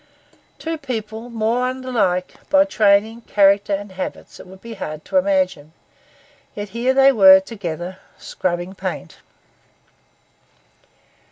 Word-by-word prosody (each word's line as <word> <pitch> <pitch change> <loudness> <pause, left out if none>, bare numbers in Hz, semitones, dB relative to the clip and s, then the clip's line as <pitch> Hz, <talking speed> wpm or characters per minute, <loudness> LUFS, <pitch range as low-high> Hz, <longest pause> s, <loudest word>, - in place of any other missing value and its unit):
Two 325 0 -5
people 225 -4 -6
more 235 +2 0
unlike 240 -9 -1 0.2
by 290 0 +5
training, 220 -3 +2
character, 200 0 +3
and 200 0 -8
habits 185 0 -7
it - - -12
would 190 +1 -14
be 230 +3 -9
hard 155 -7 -7
to - - -1
imagine; 275 - 0 0.8
yet 205 0 -6
here 240 +5 0
they 270 0 +6
were 190 -6 +8
together, 185 -3 -7 0.2
scrubbing 175 +1 -4
paint. 185 - -6
210 Hz, 115 wpm, -20 LUFS, 190-250 Hz, 0.8 s, were